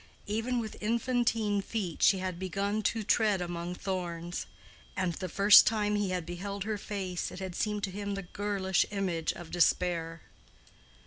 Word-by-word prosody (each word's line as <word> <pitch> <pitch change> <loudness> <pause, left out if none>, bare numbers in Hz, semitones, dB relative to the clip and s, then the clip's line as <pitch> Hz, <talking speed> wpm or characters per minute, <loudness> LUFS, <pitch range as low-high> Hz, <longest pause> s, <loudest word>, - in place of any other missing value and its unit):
Even 225 +4 -1
with 220 -2 -6
infantine 230 -2 +1
feet 195 -5 -4
she 195 - +6
had 185 -2 -4
begun 200 +3 -1
to 225 +1 0
tread 210 -2 +3
among 175 0 -4
thorns; 175 -2 -4 0.5
and 185 -2 0
the 185 +2 -5
first 200 +5 +8
time 210 -2 +1
he 205 -2 0
had 180 -2 -2
beheld 195 +3 -5
her 210 0 -3
face 190 -4 -3
it - - -9
had 190 -1 -5
seemed 210 +2 -1
to 195 - -1
him 200 +1 -4
the 195 - -4
girlish 190 0 0
image 185 -5 -1
of 170 -1 -10
despair. 170 -2 +1
195 Hz, 165 wpm, -30 LUFS, 180-210 Hz, 0.5 s, first